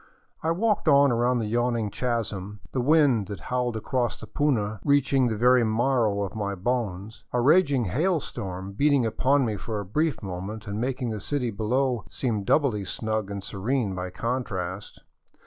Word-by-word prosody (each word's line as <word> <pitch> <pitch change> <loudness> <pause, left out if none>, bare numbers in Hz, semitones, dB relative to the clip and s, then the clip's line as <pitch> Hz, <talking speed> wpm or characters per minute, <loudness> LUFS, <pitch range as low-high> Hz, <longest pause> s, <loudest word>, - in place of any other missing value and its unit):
I 160 - -1
walked 205 +3 +1
on 140 -2 +6
around 120 +1 +2
the 115 - -1
yawning 115 -1 0
chasm, 105 -5 -3
the 130 - -1
wind 135 - +3
that 100 -1 -6
howled 125 -2 -2
across 120 +2 -1
the - - -8
puna 110 -8 0
reaching 135 -2 +3
the 110 -2 -2
very 125 +2 +5
marrow 110 -2 +1
of 100 - -5
my 100 -2 -3
bones, 105 -1 -3
a 125 - +1
raging 140 -2 +4
hail 160 - +1
storm 95 -7 -6
beating 140 +4 +2
upon 130 +5 +2
me 110 -3 -2
for 105 +2 -4
a 100 - -5
brief 150 - -1
moment 100 +4 -6
and 105 +1 -4
making 125 -1 -2
the 110 - -4
city 125 +2 -2
below 120 +4 0
seem 110 -6 -2
doubly 115 -3 +2
snug 110 +1 -3
and 100 -1 -5
serene 105 +2 -1
by 90 0 -4
contrast. 100 -4 -4
115 Hz, 170 wpm, -26 LUFS, 105-130 Hz, -, on